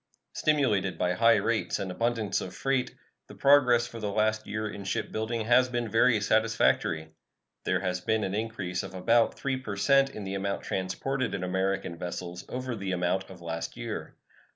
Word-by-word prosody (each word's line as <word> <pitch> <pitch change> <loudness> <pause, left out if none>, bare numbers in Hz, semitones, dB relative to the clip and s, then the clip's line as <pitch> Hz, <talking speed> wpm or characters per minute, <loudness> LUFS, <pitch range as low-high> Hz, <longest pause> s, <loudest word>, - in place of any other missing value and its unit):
Stimulated 120 -11 +1
by 90 0 +1
high 115 +4 +5
rates 115 -1 0
and 95 -1 -4
abundance 115 +1 0
of 95 - -7
freight, 135 -2 -1 0.3
the - - -12
progress 130 -4 +5
for 115 -1 -8
the 105 -2 -2
last 110 +1 +1
year 110 +1 -2
in 100 -1 -7
shipbuilding 110 +3 -2
has 125 +2 +5
been 120 -1 -1
very 115 0 +4
satisfactory. 105 -7 +1 0.5
There - - +1
has 95 -2 -2
been 110 -1 +1
an 95 - -2
increase 100 -5 -2
of 95 - -8
about 115 +5 +3
3 135 -1 -1
per 130 -6 -5
cent 135 +6 +4
in 105 -6 -7
the 95 0 -4
amount 100 0 -2
transported 130 +8 -2
in 95 - -4
American 95 -1 -1
vessels 90 0 -5
over 125 -1 -3
the 95 -3 -4
amount 90 +2 0
of 90 -2 -12
last 85 -1 -5
year. - - -5
110 Hz, 175 wpm, -28 LUFS, 95-120 Hz, 0.5 s, high